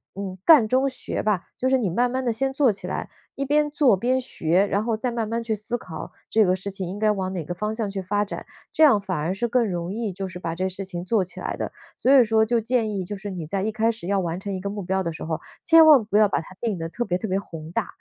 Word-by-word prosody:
嗯， 195 -1 -5
干 285 -10 +7
中 260 +4 +2
学 260 - -4
吧， 205 -5 0
就 260 - 0
是 265 - +4
你 225 -7 0
慢 245 +7 +2
慢 260 +1 -2
地 235 - +1
先 270 +4 0
做 270 -3 +3
起 200 - -6
来， - - -4 0.3
一 275 - -2
边 295 +1 +2
做 280 -8 +4
边 255 +5 +1
学， 180 -5 +1
然 200 +2 0
后 225 -2 -1
再 245 +2 -2
慢 230 -2 -2
慢 230 0 -2
去 225 - -1
思 220 +4 -3
考 160 -8 -8 0.2
这 220 -1 +4
个 185 0 +3
事 195 +2 -5
情 190 -2 -4
应 195 - -5
该 215 0 +3
往 190 -2 -2
哪 175 -4 -3
个 175 - -5
方 210 +4 -3
向 220 -2 -2
去 195 -1 -4
发 205 +3 0
展， 200 - -7 0.3
这 315 - +3
样 260 -9 +7
反 185 -4 -3
而 165 +5 -1
是 235 +4 -1
更 235 -1 +2
容 175 0 -3
易 220 -3 -2
就 195 +1 -4
是 185 -1 -8
把 165 -2 -3
这 185 - -2
个 190 - 0
事 190 +2 -5
情 175 -2 -5
做 210 -2 +2
起 180 - -8
来 - - -3
的。 - - -3 0.3
所 265 - +2
以 - - +7
说 220 0 +3
就 235 +1 +1
建 225 -1 0
议 195 -2 -2
就 205 +4 -5
是 200 0 -6
你 170 -4 -5
在 195 +2 -2
一 220 - 0
开 225 +1 +1
始 225 -6 -10
要 200 -1 +1
完 170 -1 -2
成 200 +1 -5
一 185 - -3
个 200 +2 -4
目 205 -1 -5
标 190 +1 0
的 170 - -2
时 - - -8
候， 160 -1 -2 0.2
千 325 -1 +7
万 285 -7 +8
不 205 0 +1
要 215 - +6
把 - - 0
它 165 - -14
定 220 -5 -1
得 165 0 -4
特 240 - -3
别 180 - 0
特 220 - -4
别 190 0 0
宏 165 -4 -9
大。 - - -1
205 Hz, 325 characters per minute, -24 LUFS, 185-235 Hz, 0.3 s, 万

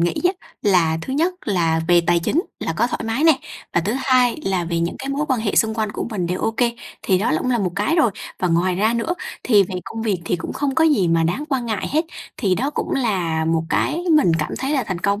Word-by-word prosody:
nghĩ 170 0 +1
á, 360 - +4 0.3
là 175 -6 +3
thứ 260 - -5
nhất 335 +6 +1
là 165 -5 +1
về 175 -1 +6
tài 175 - +4
chính 290 - 0 0.2
là - - -2
có - - +2
thoải 250 - -4
mái 225 +7 0
nè, 315 -5 +6 0.4
và 175 - +4
thứ 200 +6 -1
hai 255 -3 +3
là 185 -2 0
về 170 0 -1
những 170 - -2
cái 270 - -6
mối 285 +2 -1
quan 255 -4 +1
hệ 220 -2 -1
xung 220 0 +3
quanh 215 -2 -2
của - - -3
mình 185 -5 -2
đều 180 +2 -2
ô - - +1
kê. 240 -1 +2 0.3
Thì 190 -2 +2
đó 220 +5 0
cũng 255 - -1
là 240 - +2
một 185 -4 -1
cái 210 - +1
rồi, 275 -9 +4 0.3
và 180 - 0
ngoài 175 +2 +2
ra 215 +5 +1
nữa 280 +10 -1 0.3
thì 210 -5 +5
về 190 0 -5
công 225 +3 -6
việc 195 -6 -1
thì 175 - 0
cũng 165 - -6
không 280 -2 -1
có 320 - +4
gì 225 - +3
mà 165 0 +2
đáng 180 - -1
quan 260 -4 -1
ngại 220 -3 -2
hết. 310 +4 +1 0.3
Thì 190 -3 +1
đó 265 +9 -1
cũng - - -3
là 180 -10 0
một 165 0 +1
cái 340 - 0
mình 225 - +4
cảm 155 - -2
thấy 270 - -2
là 270 -5 +1
thành 185 -4 -3
công, 200 +3 0
210 Hz, 270 wpm, -21 LUFS, 175-265 Hz, 0.4 s, về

